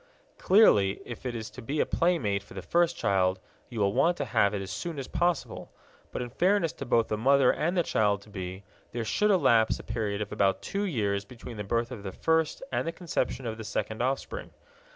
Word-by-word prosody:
Clearly, 105 - +5
if 120 +1 -7
it 120 - -4
is 110 -1 -6
to 130 - -10
be 140 +6 -3
a - - +3
playmate 130 - +1
for 100 - -15
the 95 - -6
first 170 - +2
child, 95 -1 +1 0.3
you 115 - -6
will 100 -1 +2
want 175 +8 +3
to - - -2
have 100 -4 +2
it - - -2
as 95 - -7
soon 170 -3 -4
as 135 - -5
possible. 175 -3 -1 0.4
But, - - -3
in 120 - -8
fairness 180 - +2
to - - -7
both 115 -2 +3
the 105 - -2
mother 135 +2 +5
and 170 +4 -1
the 175 - +4
child 100 -6 +1
to 105 - -17
be, 95 0 -6 0.3
there 115 -1 -2
should 210 - +1
elapse 125 - +4
a - - -10
period 105 -3 -2
of 105 -1 -4
about 95 -1 +1
two 200 +1 -2
years 100 - -1
between 115 +2 -10
the 105 - -3
birth 115 +4 -1
of 120 -5 -7
the 100 -1 -5
first 160 - 0
and - - -1
the - - 0
conception 145 -7 -3
of 115 -1 -4
the - - -5
second 110 +1 -3
offspring. 135 - -2
120 Hz, 225 wpm, -28 LUFS, 100-165 Hz, 0.4 s, Clearly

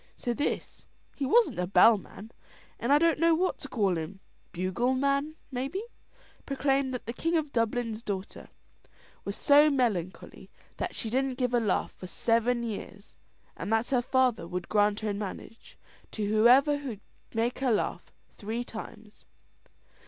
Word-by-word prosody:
So 240 - -2
this 290 +5 -3 0.3
he 275 - -2
wasn't 305 - +3
a 180 - 0
bellman, 215 +1 +3 0.5
and 235 - -1
I 290 - +7
don't 330 0 +2
know 335 0 +4
what 370 +3 0
to 280 - -8
call 195 -10 0
him 170 +5 -7 0.3
bugleman, 260 - 0 0.2
maybe, 270 - -3 0.6
proclaimed 275 -1 0
that 250 - -6
the 235 - -4
King 330 +6 0
of 305 -3 -2
Dublin's 230 -1 -1
daughter 200 -3 -6 0.7
was 200 - -5
so 295 +1 +6
melancholy 220 - -2 0.3
that - - -4
she 220 - -4
didn't 260 0 0
give 250 -2 0
a 240 - +4
laugh 215 -5 0
for 185 - -10
seven 235 +5 +1
years, 205 -2 -7 0.4
and - - -5
that 225 +3 +1
her 250 -2 +3
father 250 -8 +1
would 180 0 -5
grant 210 0 +2
her 215 -1 -1
in 200 - -4
marriage 215 +2 -8 0.4
to 215 - -2
whoever 245 +8 +5
could 245 -8 -6 0.3
make 230 +2 0
her 265 -2 +1
laugh 215 - -1 0.3
three 225 +4 -3
times. 220 -2 -10
235 Hz, 155 wpm, -28 LUFS, 210-275 Hz, 0.7 s, I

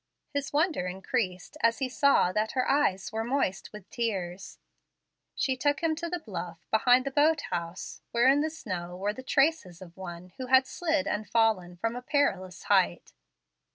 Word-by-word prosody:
His 285 0 -2
wonder 300 - +1
increased 190 +4 -3
as 230 0 +3
he 265 - -1
saw 270 -7 +3
that 215 +3 -1
her 255 -1 0
eyes 195 -10 +1
were 220 0 -2
moist 240 -6 -1
with 210 -3 -11
tears. 195 -6 -3 0.8
She 265 - 0
took 285 +3 0
him 320 -1 +2
to 340 +1 -4
the 355 - -2
bluff, 180 - -7
behind 245 +4 +4
the 275 - -2
boat 300 +2 +3
house, 170 0 -5
where 235 +2 +3
in 275 +2 +5
the 310 - 0
snow 180 - -6
were 205 +2 -1
the 260 - -8
traces 270 - +1
of 175 -2 -12
one 180 -1 -8
who 260 -1 -5
had 260 +1 +6
slid 310 +2 -1
and 210 +1 -3
fallen 215 -6 +2
from 225 +6 -2
a 245 - -5
perilous 250 - 0
height. 190 -3 +1
230 Hz, 180 wpm, -28 LUFS, 185-280 Hz, 0.8 s, had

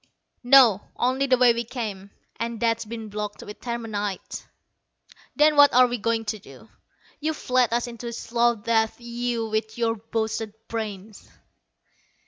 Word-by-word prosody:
"No 245 -6 +6
only 260 +3 +1
the 255 -1 +4
way 245 -1 +6
we 235 +1 -2
came. 215 -5 -6 0.3
And 230 0 -3
that's 230 -1 0
been 225 0 -7
blocked 210 0 -5
with 210 - -10
terminite." 220 -5 -4 0.9
"Then 300 0 +4
what 285 -1 +7
are 255 0 +8
we 245 -1 -3
going 225 +1 -1
to 215 0 -3
do? 135 - -15 0.5
You've 310 +1 -4
led 250 -2 +4
us 235 +1 +1
into 240 0 -8
a 235 - -5
slow 235 +1 +1
death, 220 +1 0
you 235 -1 -3
with 220 +1 -3
your 230 -1 +1
boasted 220 0 -3
brains!" 215 -2 -6
230 Hz, 150 wpm, -24 LUFS, 220-240 Hz, 0.9 s, are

